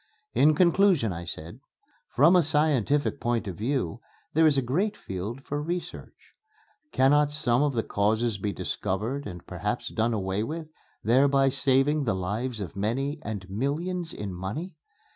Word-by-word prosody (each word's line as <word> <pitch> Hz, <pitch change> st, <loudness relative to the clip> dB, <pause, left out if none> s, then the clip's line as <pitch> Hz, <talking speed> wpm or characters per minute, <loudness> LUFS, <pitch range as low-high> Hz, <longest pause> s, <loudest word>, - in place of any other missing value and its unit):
In 150 Hz, +1 st, +5 dB
conclusion, 170 Hz, -, +4 dB
I 85 Hz, 0 st, -6 dB
said, 85 Hz, 0 st, -7 dB, 0.5 s
"From 155 Hz, +8 st, +5 dB
a 180 Hz, -, +6 dB
scientific 145 Hz, -2 st, +1 dB
point 120 Hz, -2 st, 0 dB
of 95 Hz, -, -4 dB
view 115 Hz, -, -2 dB, 0.3 s
there 160 Hz, +1 st, +5 dB
is 145 Hz, -2 st, +3 dB
a 135 Hz, -, +2 dB
great 190 Hz, -, 0 dB
field 105 Hz, +8 st, -6 dB
for 145 Hz, +1 st, -3 dB
research.... 175 Hz, +3 st, -6 dB, 0.6 s
Cannot 145 Hz, +2 st, +4 dB
some 125 Hz, -4 st, +1 dB
of 145 Hz, -1 st, +2 dB
the 115 Hz, -2 st, 0 dB
causes 110 Hz, +1 st, 0 dB
be 100 Hz, +1 st, -1 dB
discovered 110 Hz, +10 st, -3 dB
and 90 Hz, -3 st, -9 dB
perhaps -, -, -3 dB
done 115 Hz, +1 st, 0 dB
away 95 Hz, 0 st, -1 dB
with, 155 Hz, +7 st, -5 dB, 0.3 s
thereby 135 Hz, +3 st, +4 dB
saving 135 Hz, +2 st, +2 dB
the 115 Hz, -, +1 dB
lives 110 Hz, +6 st, -3 dB
of 95 Hz, -4 st, -6 dB
many 135 Hz, +9 st, -1 dB
and 105 Hz, -8 st, -5 dB
millions 160 Hz, -, -2 dB
in 100 Hz, -3 st, -5 dB
money? 100 Hz, -, -5 dB
130 Hz, 155 wpm, -27 LUFS, 105-150 Hz, 0.6 s, a